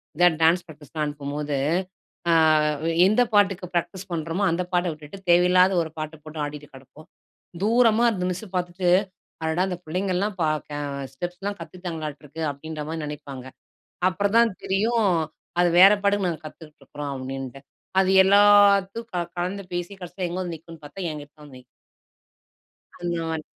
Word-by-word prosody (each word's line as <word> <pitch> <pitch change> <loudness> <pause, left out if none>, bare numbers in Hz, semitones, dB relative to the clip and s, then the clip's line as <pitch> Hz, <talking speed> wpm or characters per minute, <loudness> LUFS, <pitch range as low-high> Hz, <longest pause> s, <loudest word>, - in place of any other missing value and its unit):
இந்த 175 +2 +4 0.2
டான்ஸ் 170 +2 +4
ப்ராக்டிஸ்லாம் 155 -1 -6
அனுப்பும்போது, 145 0 -4 0.8
ஆ - - +4 0.7
எந்த 215 +5 +4
பாட்டுக்கு 195 -3 +3
ப்ராக்டிஸ் 175 +3 -2
பண்ணுறோமோ 165 +4 -1
அந்த 175 +2 0
பாட்ட 180 0 +2
விட்டுட்டு, 155 +5 -11
தேவையில்லாத 180 +2 +5
ஒரு 160 - -6
பாட்டு 155 +1 -5
போட்டு 155 0 -7
ஆடிட்டு 145 0 -7
கெடப்போம். 135 +4 -15 0.5
தூரமா 230 +1 +4
அந்த 180 -3 -3
மிஸ் 185 +4 -4
பார்த்துட்டு 175 0 0 0.5
அடடா! 160 +3 0
அந்த 180 - -3
பிள்ளைங்கல்லாம் 185 +4 -1
ப - - +2 0.2
கெ 145 - -5 0.4
ஸ்டெப்ஸ்லாம் 180 +7 -5
கத்துக்கிட்டாங்களாட்டுருக்கு 160 -4 -7
அப்டின்ற 155 +2 -6
மாரி 160 -1 -4
நெனைப்பாங்க. 140 -3 -7 0.6
அப்புறம் 200 +3 -1
தான் 235 -3 +4
தெரியும் 220 +3 +1 0.5
அது 175 0 +4
வேற 195 +2 +10
பாட்டுக்கு 200 -2 +2
நாங்க 165 -3 -3
கத்துக்கிட்டுருக்றோம் 150 -2 -9
அப்டின்டு. 135 0 -6 0.4
அது 190 0 +3
எல்லாத்தும் 205 +2 +5
க - - -5 0.2
கலந்து 190 +3 -3
பேசி 175 +3 -3
கடைசியில 180 +1 -4
எங்கு 180 - -4
வந்து 175 -2 -4
நிக்கும்ன்னு 165 -1 -14
பார்த்தா, 145 +7 -9
என்கிட்ட 145 -1 -9
தான் 145 -2 -13
நிக்கும். 125 - -16 1.4
அந்த 175 -1 -2
மாரி 160 -1 -3
175 Hz, 145 wpm, -24 LUFS, 150-195 Hz, 1.4 s, வேற